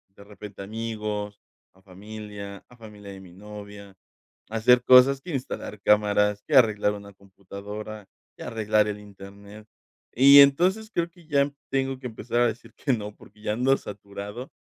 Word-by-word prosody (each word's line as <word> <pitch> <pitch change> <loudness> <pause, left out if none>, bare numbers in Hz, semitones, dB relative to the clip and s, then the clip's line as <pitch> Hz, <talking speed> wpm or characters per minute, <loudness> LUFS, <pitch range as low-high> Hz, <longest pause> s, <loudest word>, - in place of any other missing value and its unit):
de 100 - -14
repente 100 -1 -11
a 100 - -6
amigos, 105 -2 -5 0.3
a 95 - -25
familia 100 +1 -10
a 125 - -19
familia 105 -3 -12
de 95 - -10
mi 90 -2 -14
novia, 100 0 -11 0.6
a 110 - -6
hacer 125 +2 +4
cosas, 130 +2 +6
que 175 - -8
instalar 125 -6 -5
cámaras, 105 0 +2
que - - -2
arreglar 105 -5 +4
una 100 0 -10
computadora, 100 +2 -10 0.3
que - - -10
arreglar 105 -1 +1
el 105 0 -4
internet 100 +1 -13 0.5
y 140 +3 +8
entonces 180 +10 +3
creo 170 0 -1
que 170 -2 -21
ya 140 -2 +2 0.2
tengo 135 -1 -1
que 130 - -6
empezar 120 +1 -2
a 120 - +4
decir 115 0 -7
que 140 - -1
no, 105 -2 -5
porque 105 - -19
ya 105 - -2
ando 130 +4 +2
saturado, 105 +4 -9
105 Hz, 170 wpm, -25 LUFS, 100-125 Hz, 0.6 s, y